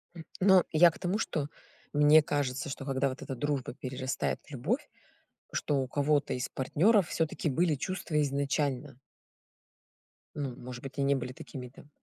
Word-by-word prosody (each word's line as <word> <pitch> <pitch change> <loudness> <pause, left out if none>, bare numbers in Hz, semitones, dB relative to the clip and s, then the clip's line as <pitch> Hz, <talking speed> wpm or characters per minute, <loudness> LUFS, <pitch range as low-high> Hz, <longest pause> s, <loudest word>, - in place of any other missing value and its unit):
М. 165 - -9
Но 190 -1 +6
я 170 +2 +7
к - - -14
тому, 185 +4 0
что, 155 -9 -2 0.5
мне 150 +2 +7
кажется, 145 0 -2
что 135 0 -6
когда 135 0 +1
вот 130 - -7
эта 135 - -5
дружба 140 -1 -2
перерастает 130 -1 -3
в - - -17
любовь, 185 - -2 0.6
что 140 -2 0
у 130 - -3
кого-то 145 +1 +1
из 125 0 -2
партнеров 180 - +3
всё-таки 160 -1 -1
были 160 +3 +2
чувства 155 0 -2
изначально. 140 -1 -1 1.4
Ну, 135 -4 -3
может 125 0 -9
быть, 135 0 -8
и 140 - 0
не 140 0 +3
были 125 0 -4
такими 125 -3 -8
там 140 +3 -16
145 Hz, 165 wpm, -30 LUFS, 130-155 Hz, 1.4 s, я